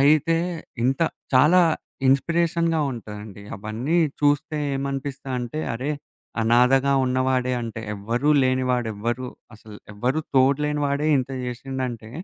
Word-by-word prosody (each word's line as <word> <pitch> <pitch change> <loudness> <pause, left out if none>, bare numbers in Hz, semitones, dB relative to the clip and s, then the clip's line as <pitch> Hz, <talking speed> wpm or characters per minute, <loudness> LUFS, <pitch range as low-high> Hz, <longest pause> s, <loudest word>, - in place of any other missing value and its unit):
అయితే 155 +3 +4 0.5
ఇంత 135 +3 +1 0.3
చాలా 150 +8 +6 0.5
ఇన్స్‌పీరేషన్‌గా 165 +3 +2
ఉంటదండి. 105 -3 -9
అవన్నీ 110 - -2 0.3
చూస్తే 145 +1 +2 0.2
ఏమనిపిస్తదంటే, 135 -1 -3
అరే! 130 +5 -3 0.5
అనాధగా 125 +4 +4
ఉన్నవాడే 130 0 +1
అంటే 115 0 -5
ఎవ్వరు 115 +7 -1
లేనివాడు 130 -2 +1
ఎవ్వరు, 120 +5 -3 0.3
అసలు 105 -1 -13 0.2
ఎవ్వరు 125 +8 0 0.2
తోడ్‌లేని 145 +3 +3
వాడే 140 +2 0
ఇంత 130 +1 -3 0.2
చేసిందంటే, 125 -3 -5
130 Hz, 105 wpm, -24 LUFS, 120-145 Hz, 0.5 s, చాలా